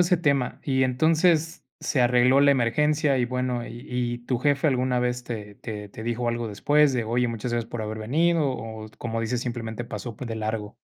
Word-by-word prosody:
ese 180 +1 +4
tema, 140 -6 0
y 130 -1 +1
entonces 160 +5 +2 0.2
se 135 - 0
arregló 125 +2 +5
la 140 0 +6
emergencia 140 +3 +2
y, 120 - +1
bueno, 125 -1 -2
¿y 120 +4 -9
y 120 -1 -2
tu 125 -1 0
jefe 145 +3 +2
alguna 130 -2 +1
vez 125 0 -1
te 105 -4 -6
te 105 -3 -7
te 110 - -9
dijo 120 +1 -2
algo 120 -1 -1
después 145 +6 +3
de: 120 - 0
"oye, 120 +2 +1
muchas 115 +1 -4
gracias 115 -1 -1
por 115 -2 -4
haber 110 +1 -4
venido" 155 +6 +2
o, 110 -3 -6
como 115 -1 -3
dices, 120 +2 -1
simplemente 120 -2 -4
pasó 120 -2 -6
p 130 - -6
de 115 -1 -4
largo? 110 0 -3
125 Hz, 205 wpm, -25 LUFS, 115-140 Hz, 0.2 s, la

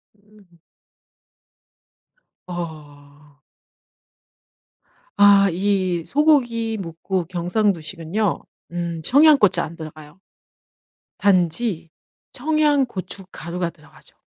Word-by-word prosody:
음음. 205 -4 -24 1.9
아. 150 -4 -9 1.9
아 200 -1 +6
이 185 -1 0
소고기뭇국 225 - 0
경상도식은요 180 0 -1 0.4
음 170 -1 -4
청양고추 265 - +5
안 165 +1 -6
들어가요. 155 +1 -11 1.0
단지 180 -1 +1 0.4
청양 295 0 +1
고춧가루가 180 -4 -4
들어가죠. 155 -3 -21
185 Hz, 165 characters per minute, -21 LUFS, 165-215 Hz, 1.9 s, 아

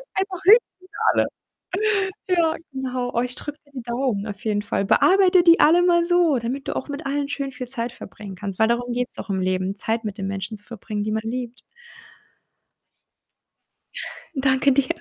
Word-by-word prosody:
Einfach 385 -2 -2
Hühnchen 440 +5 +9 0.3
für - - -9
alle. - - +2 1.0
Ja, 335 -3 +2 0.2
genau. 255 -2 -3
Oh, 235 - +1
ich 250 0 -3
drücke 295 0 -7 0.2
die 255 - -6
Daumen 235 -3 -2
auf 205 -2 -8
jeden 210 -2 0
Fall. 200 -1 -1
Bearbeite 370 - +5
die 335 0 +6
alle 340 +3 +6
mal 345 -1 +4
so, 345 -5 +3
damit 255 +4 -4
du - - -3
auch - - -3
mit 285 +2 -6
allen 280 +1 -1
schön 275 -1 -3
viel 250 -1 -7
Zeit 240 -2 +1
bringen 200 -2 -10
kannst, 195 +1 -6
weil 220 - +5
darum 245 +1 -1
geht's 250 0 -2
doch - - -8
im 190 - 0
Leben, 185 +1 -1
Zeit 225 +2 +2
mit 210 0 -5
den 195 - -3
Menschen 195 +2 -4
zu 205 - -9
verbringen, 215 -3 -5
die 215 - -2
man 220 0 -1
liebt. 245 +1 -5 2.8
Danke 265 0 +3
dir. 275 0 +2
250 Hz, 185 wpm, -23 LUFS, 215-290 Hz, 2.8 s, Hühnchen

